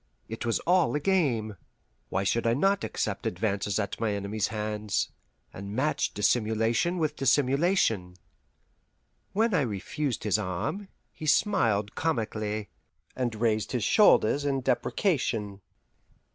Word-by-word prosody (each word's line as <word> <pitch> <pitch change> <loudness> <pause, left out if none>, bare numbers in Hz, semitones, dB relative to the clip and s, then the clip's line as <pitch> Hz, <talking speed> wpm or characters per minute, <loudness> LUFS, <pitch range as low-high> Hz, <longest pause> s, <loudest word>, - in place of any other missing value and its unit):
It 115 +1 -5
was 115 - +2
all 175 -3 +2
a - - +1
game; 135 - 0 0.5
why 95 - -1
should 115 +4 0
I 115 - +3
not 195 +7 +2
accept - - -2
advances 100 +1 -1
at 100 -2 -3
my 110 -2 0
enemy's 100 +1 -2
hands, 105 -1 -2 0.4
and 100 +2 -7
match 150 +5 0
dissimulation 115 - +1
with 155 -3 -1
dissimulation? 135 - +2 1.2
When 220 +2 +2
I 170 - +3
refused 120 - -3
his 105 0 +1
arm, 110 - -3 0.2
he 155 - -8
smiled 110 - +2
comically, 110 -7 -2 0.5
and 120 -3 -2
raised 110 0 0
his 120 -4 0
shoulders 145 - +4
in 140 -2 0
deprecation. 120 - -1
115 Hz, 125 wpm, -28 LUFS, 105-150 Hz, 1.2 s, shoulders